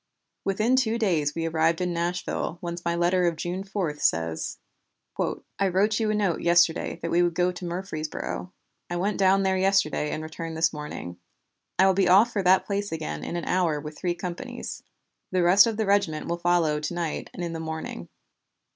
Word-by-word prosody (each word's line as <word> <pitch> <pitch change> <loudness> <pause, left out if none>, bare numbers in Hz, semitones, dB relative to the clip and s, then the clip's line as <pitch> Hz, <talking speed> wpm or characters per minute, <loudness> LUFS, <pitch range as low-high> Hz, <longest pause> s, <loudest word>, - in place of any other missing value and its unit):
Within 215 +6 +2
two 230 -3 +2
days 165 -10 +1
we 165 0 -2
arrived 165 0 +2
in 180 -1 -1
Nashville 170 0 -2
whence 170 0 -5
my 170 0 0
letter 175 +1 +2
of 170 - 0
June 175 +4 -3
4 190 -7 -3
says: 80 - 0 1.0
"I 200 - +3
wrote 205 +4 +2
you 220 -1 +1
a 215 - +1
note 200 -5 0
yesterday 170 -1 +3
that 165 - -2
we 175 - +4
would 175 -1 +1
go 180 +1 +2
to 180 0 -8
Murfreesboro. 175 0 -4 0.4
I 175 - -3
went 195 +4 -1
down 195 0 +4
there 190 0 +2
yesterday 190 -6 +2
and 155 - -3
returned 160 +1 -6
this 165 +1 +2
morning. 150 - -7 0.6
I 190 - +6
will 190 - +5
be 190 -1 +2
off 210 +6 +6
for 205 - +1
that 185 +1 +4
place 200 0 -2
again 75 - -4
in - - -4
an 170 - -3
hour 175 -5 +1
with 150 +1 -8
three 175 +1 -2
companies. 180 +9 -6 0.5
The 185 -1 +2
rest 190 +5 +7
of 225 -2 -2
the 220 - 0
regiment 200 -6 +1
will 170 0 -2
follow 170 -3 +2
to 150 +3 -3
night 170 -3 -3
and 175 - -6
in 170 -1 -3
the 165 - -4
morning. 160 0 -5
175 Hz, 200 wpm, -26 LUFS, 160-195 Hz, 1.0 s, rest